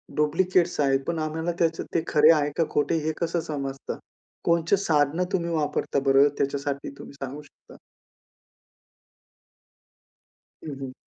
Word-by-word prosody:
Duplicates 175 +3 +2
आहेत 135 -1 +3
पण 170 -1 -1
आम्हाला 160 +2 -2
त्याचं 165 -1 +1
ते 165 - +1
खरे 150 +1 +6
आहे 150 -2 +1
का 165 - +4
खोटे 150 +3 +1
हे 160 - +1
कसं 170 +1 0
समजतं? 135 -2 -4 0.5
कोणचे 170 +3 +2
साधनं 160 -2 +1
तुम्ही 170 -2 0
वापरता 150 -2 0
बरं 135 +1 +6
त्याच्यासाठी 140 0 -2
तुम्ही - - -11
सांगू 140 +1 -7
शकता? 145 - -19 2.9
हं, 150 -3 -5
हं. 130 -1 -6
150 Hz, 130 wpm, -25 LUFS, 140-165 Hz, 2.9 s, खरे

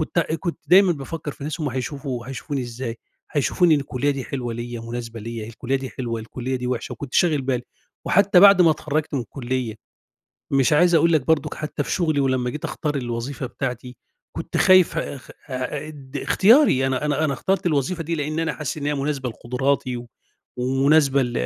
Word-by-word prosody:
كت 155 - -2 0.2
كنت 170 -3 -3
دايمًا 185 +3 +6
بافكر 145 +1 -6
في 140 - -10
ناس 155 +3 -4
هُم 150 - 0
هيشوفوا 130 -1 -4
هيشوفوني 135 +1 -4
إزاي، 120 -1 -5 0.3
هيشوفوني 160 +3 +3
إن 145 - +1
الكُلِّيَّة 135 +1 -1
دي 135 -2 -3
حلوة 120 -1 -4
ليَّ، 120 0 -5
مناسبة 115 -1 -6
ليَّ، 115 0 -6
الكُلِّيَّة 125 +4 -2
دي 135 -1 -6
حلوة، 115 -3 -4
الكُلِّيَّة 130 +3 -4
دي 125 - -4
وحشة، 125 -1 -3
وكنت 140 -2 -8
شاغل 155 -6 +3
بالي، 130 -2 -1 0.4
وحتى 200 -1 +5
بعد 195 -1 +8
ما 165 - +6
اتخرَّجت 155 0 -2
من 135 - 0
الكُلِّيَّة، 125 -2 -3 0.8
مش 135 +1 +3
عايز 175 +3 +5
أقول 165 +1 +4
لك 150 -5 +2
برضك 155 -2 +1
حتى 150 -1 -3
في - - -6
شغلي، 155 -5 +1
ولمّا 130 -2 +1
جيت 150 +4 -7
أختار 150 -2 -2
الوظيفة 125 +1 -4
بتاعتي، 125 -1 -5 0.4
كنت - - -4
خايف 185 -2 +5
آآ، 140 - -4 0.7
اد 140 -2 -9
اختياري، 200 - +4
أنا 130 +1 -1
أنا 150 +1 +1
أنا 150 - +1
اخترت 190 +8 -1
الوظيفة 165 +2 0
دي 165 +1 -2
لأن 155 0 -2
أنا 165 0 0
حاسس 150 0 -4
إن 145 - -4
هي 150 - +1
مناسبة 140 -2 -2
لقدراتي 125 +2 -1
و 120 0 -8 0.5
ومناسبة 135 +2 +3
ل 120 -1 -3
140 Hz, 185 wpm, -23 LUFS, 125-155 Hz, 0.8 s, بعد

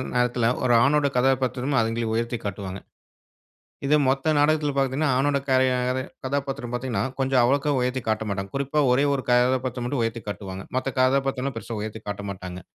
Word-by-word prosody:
நேரத்துல 125 -1 +2
ஒரு 120 -1 +4
ஆணோட 145 +1 +3
கதாபாத்திரமும் 130 +1 +1
அதுங்களே 115 0 -1
உயர்த்தி 115 +1 -1
காட்டுவாங்க. 100 -1 -5 1.1
இது 150 - +3
மொத்த 135 +4 +2
நாடகத்துல 150 -1 +2
பாத்தீங்கன்னா, 135 +2 +1
ஆணோட 140 +1 +2
கரை 130 0 +4
யாரு 125 +1 0 0.2
கதாபாத்திரம் 135 -2 -3
பாத்தீங்கன்னா, 125 -1 -1 0.2
கொஞ்சம் 130 -1 +3
அவ்வளவுக்கா 140 +4 +2
உயர்த்தி 125 +1 -1
காட்டமாட்டாங்க. 100 -3 -2
குறிப்பா 140 +2 0
ஒரே 140 +3 +3
1 135 - -3
கதாபாத்திரம் 125 0 +2
மட்டும் 125 -2 -1
உயர்த்திக் 115 -1 -4
காட்டுவாங்க. 95 -2 -7
மத்த 130 +1 -1
கதாபாத்திரம்லாம் 135 0 +1
பெருசா 115 0 -6
உயர்த்தி 110 +1 -6
காட்டமாட்டாங்க. 100 -3 -6
125 Hz, 150 wpm, -24 LUFS, 115-135 Hz, 1.1 s, ஒரு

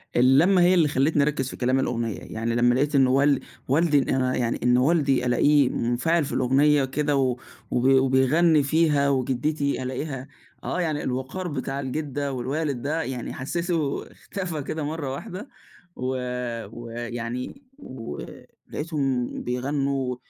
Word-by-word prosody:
اللمّة 145 +10 +5
هي 175 +1 +5
اللي 170 -4 +4
خلّتني 145 +1 +2
أركز 140 -3 -1
في - - -8
كلام 130 +1 +1
الأغنية، 115 -4 -2
يعني 115 +1 -3
لمَّا 120 +1 +3
لقيت 145 +3 +1
إنّ 135 -2 +5
وال 140 +2 +3 0.3
والدي 150 +2 +3
إن 135 - -2
أنا 130 -1 +1
يعني 120 -1 -1
إن 125 0 +4
والدي 135 -2 +2
ألاقيه 140 +2 +4
منفعل 145 +9 0
في 140 - -6
الأغنية 140 +3 +3
وكده 145 +2 0
و 130 -2 +1 0.3
وبي 130 +2 +3
وبيغني 135 +4 +4
فيها، 150 -1 +2
وجدتي 140 +2 0
ألاقيها 130 +1 -4 0.4
آه 180 - -2
يعني 155 -3 -1
الوقار 130 +9 -3
بتاع 135 -3 -3
الجدة 140 0 -3
والوالد 135 +1 -2
ده 155 +4 -1
يعني 130 -5 -5
حسيته 165 +1 -2
اختفى 180 -6 -5
كده 155 +2 -4
مرَّة 145 -2 -3
واحدة 185 - -7 0.5
و 130 +1 -2 0.6
ويعني 120 - -6 0.2
ولقيتهم 135 - -5 0.2
بيغنوا 135 +1 -1
135 Hz, 140 wpm, -25 LUFS, 125-150 Hz, 0.6 s, اللمّة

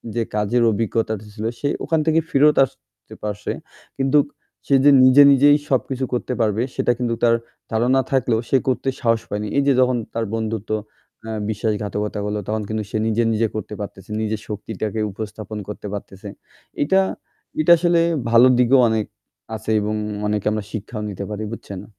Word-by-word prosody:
যে 115 - +1
কাজের 105 +3 +1
অভিজ্ঞতাটা 110 0 -1
ছিলো 110 +1 -3
সে 145 - 0 0.2
ওখান 160 -1 +1
থেকে 160 0 +3
ফেরত 150 +2 +4
আসতে - - -17
পারছে; 105 0 -3 0.5
কিন্তু 135 +2 +3 0.5
সে 140 - +4
যে 145 - +8
নিজে 130 +2 +7
নিজেই 145 +2 +6
সবকিছু 130 0 0
করতে 125 +1 -2
পারবে 110 0 +1
সেটা - - +2
কিন্তু 120 -1 -1
তার 115 -1 +5 0.4
ধারণা 125 +4 +2
থাকলেও 125 -4 +2
সে 135 - +4
করতে 130 +1 0
সাহস 115 -1 +2
পায়নি, 105 +1 -3
এই 140 - +4
যে 140 - +5
যখন 125 -1 +3 0.2
তার 115 0 -1
বন্ধুত্ব 110 -1 -3 0.6
আ - - -5 0.2
বিশ্বাসঘাতকতা 105 -1 -2
হল 105 0 -2
তখন 110 0 -1
কিন্তু 110 -1 -2
সে - - -2
নিজে 115 +1 +1
নিজে 110 +1 +1
করতে 105 0 -5
পারতেছে 100 -1 -8
নিজের 110 -1 -2
শক্তিটাকে 105 0 -4
উপস্থাপন 110 +1 -7
করতে 105 0 -7
পারতেছে 100 0 -8 0.5
এইটা, 190 +7 +4 0.6
এইটা 155 +3 +4
আসলে 170 0 +2 0.3
ভালো 120 +2 +7
দিকেও 125 +2 +5
অনেক 110 -1 0 0.5
আছে 110 +1 -4
এবং 105 +1 -2 0.3
অনেকে 105 -1 -1
আমরা 110 -1 -2
শিক্ষাও 110 +1 -5
নিতে 100 0 -5
পারি 105 0 -4
বুঝছেন? 100 -4 -8
110 Hz, 165 wpm, -21 LUFS, 105-130 Hz, 0.6 s, যে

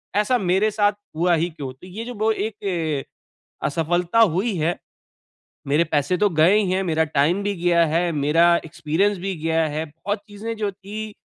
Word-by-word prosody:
ऐसा 210 +5 +2
मेरे 195 +2 +1
साथ 205 -1 +2 0.2
हुआ 175 +2 +2
ही 170 +2 0
क्यों? 140 -5 -7
तो 180 +8 -15
ये 215 +5 -7
जो 245 - -6
ब 215 +2 +1
एक 180 -10 -2 0.6
असफ़लता 175 +6 0
हुई 200 +2 +3
है, 165 +2 0 0.9
मेरे 150 +4 +3
पैसे 155 +3 0
तो 205 -1 +3
गए 165 +4 +4
ही 195 -4 +1
हैं 190 +1 +1
मेरा 160 -2 +1
टाइम 155 +6 +1
भी 205 -1 -1
गया 170 -1 +3
है, 170 +2 +1
मेरा 165 +3 +3
एक्सपीरियंस 175 +5 0
भी 190 +1 -3
गया 165 0 +2
है, 155 +2 -3
बहुत 185 +8 -4
चीज़ें 215 +3 -6
जो 205 -2 -1
थी 205 +2 -7
180 Hz, 180 wpm, -22 LUFS, 160-205 Hz, 0.9 s, गए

